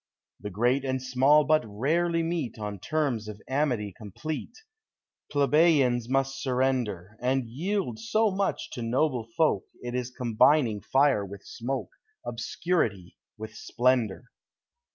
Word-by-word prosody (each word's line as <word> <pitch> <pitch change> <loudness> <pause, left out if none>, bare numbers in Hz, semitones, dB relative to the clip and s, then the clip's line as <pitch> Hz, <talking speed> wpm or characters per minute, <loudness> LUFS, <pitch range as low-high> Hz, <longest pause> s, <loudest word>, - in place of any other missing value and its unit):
The 105 - -6
great 120 +7 +1
and 130 -1 -1
small 130 +4 +4
but 155 +1 +3
rarely 165 +11 0
meet 165 -8 -2
On 105 -2 -5
terms 135 - -1
of 105 -1 -7
amity 130 -8 0
complete; 130 +9 -6 0.7
Plebeians 140 -5 +3
must 135 0 0
surrender. 125 -7 -1
And 130 +1 +1
yield 165 - -2
so 225 -2 +2
much 195 +1 -2
to 120 - -6
noble 120 0 0
folk, 160 -1 +2 0.2
It 120 0 -4
is 125 -1 -2
combining 120 -2 +3
fire 135 -6 +3
with 100 0 -9
smoke, 125 +3 -4 0.4
Obscurity 110 - -2 0.2
with 110 0 -7
splendor. 125 -1 0
130 Hz, 125 wpm, -27 LUFS, 110-150 Hz, 0.7 s, small